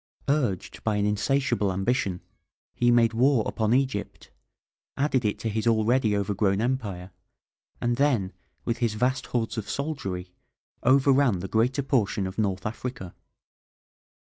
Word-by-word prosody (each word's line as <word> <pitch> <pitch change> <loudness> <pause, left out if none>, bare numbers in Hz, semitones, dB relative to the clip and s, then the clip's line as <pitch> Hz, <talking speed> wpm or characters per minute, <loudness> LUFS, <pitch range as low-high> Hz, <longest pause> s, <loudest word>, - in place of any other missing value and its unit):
Urged 125 - -1
by 110 -2 +1
an 105 0 +1
insatiable 115 0 +1
ambition, 95 -1 -1 0.5
he 120 - +2
made 115 -1 +4
war 125 0 +3
upon 110 -1 -1
Egypt, 130 -5 -1 0.7
added 140 -3 +1
it 105 -1 0
to - - -4
his 110 +1 -1
already 110 -1 +2
overgrown 100 0 0
empire, 105 -7 -2 0.7
and 120 0 0
then, 125 -10 +1 0.3
with 115 -1 -1
his 115 -3 0
vast 125 +3 0
hordes 115 -2 -2
of 105 - -7
soldiery, 95 - -4 0.5
overran 135 -3 +4
the 90 +2 -5
greater 125 +7 +1
portion 110 -7 0
of 95 +3 -5
North 95 -4 -1
Africa. 110 -4 -5
115 Hz, 135 wpm, -26 LUFS, 100-130 Hz, 0.7 s, made